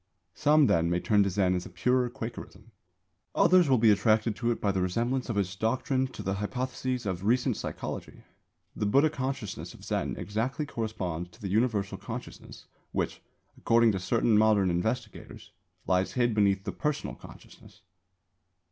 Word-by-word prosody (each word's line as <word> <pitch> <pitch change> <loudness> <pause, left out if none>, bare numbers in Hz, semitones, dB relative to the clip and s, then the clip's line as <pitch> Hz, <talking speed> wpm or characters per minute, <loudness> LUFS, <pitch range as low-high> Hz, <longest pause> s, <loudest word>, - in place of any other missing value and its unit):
Some, 150 0 +4
then, 85 -7 +2
may 85 0 +1
turn 105 +2 +3
to 100 - +2
Zen 95 -1 +1
as 90 -1 -3
a - - -12
purer 125 +8 +1
Quakerism. 115 0 -8 0.6
Others 180 -3 +5
will 130 - +5
be 110 -1 +5
attracted 110 +2 +2
to 120 +1 -1
it 120 - 0
by 100 - +1
the 95 -1 -1
resemblance 120 +8 -1
of 115 - -2
its 95 -1 -1
doctrines 130 +5 0
to - - -7
the 95 - -1
hypotheses 125 +4 -3
of 95 -2 -3
recent 120 +3 +2
psychology. - - -6 0.5
The 105 - -1
Buddha 140 +8 +4
consciousness 130 -7 -4
of - - -16
Zen - - -2
exactly 115 +8 -2
corresponds 95 - -4
to 85 - -20
the 100 - -5
Universal 105 -1 0
Consciousness - - -9 0.3
which, - - -2 0.3
according 115 0 +3
to 95 - -2
certain 110 +2 +2
modern 105 -4 +4
investigators, 110 +6 -4 0.3
lies 95 0 +1
hid 120 -2 +1
beneath 100 -2 +2
the - - -3
personal 150 -1 -2
Consciousness. - - -15
110 Hz, 165 wpm, -28 LUFS, 95-125 Hz, 0.6 s, Others